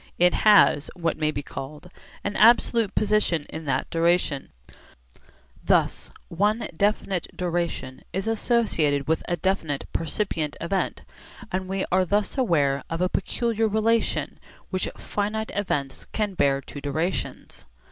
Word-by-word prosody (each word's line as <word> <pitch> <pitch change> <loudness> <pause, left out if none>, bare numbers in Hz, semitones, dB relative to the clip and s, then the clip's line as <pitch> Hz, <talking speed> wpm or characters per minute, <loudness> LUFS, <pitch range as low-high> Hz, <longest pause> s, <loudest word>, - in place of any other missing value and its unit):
It 180 0 +4
has, 205 -8 +5
what 165 -3 -1
may 155 -1 +2
be 145 -1 -3
called, 150 +6 -8 0.3
an 205 +1 -3
absolute 230 -1 +4
position 210 -7 +1
in 160 0 -6
that 135 -2 0
duration. 165 - +1 1.1
Thus - - +1 0.2
one 210 +6 0
definite 200 -1 0
duration 170 -7 -2
is 190 +3 -3
associated 210 - +1
with 160 +1 +1
a 175 - 0
definite 160 -5 -1
percipient 165 -2 -2
event, 190 +3 -2 0.5
and 185 0 -2
we 195 0 -1
are 185 +1 +4
thus 205 +3 0
aware 145 - +2
of 165 - -3
a 180 0 +2
peculiar 225 0 0
relation 220 +2 0 0.3
which 185 -2 -1
finite 215 +2 -3
events 145 -9 -2
can 210 -2 -1
bear 140 -5 +2
to 145 - -9
durations. 160 +6 -3
180 Hz, 130 wpm, -25 LUFS, 155-210 Hz, 1.1 s, has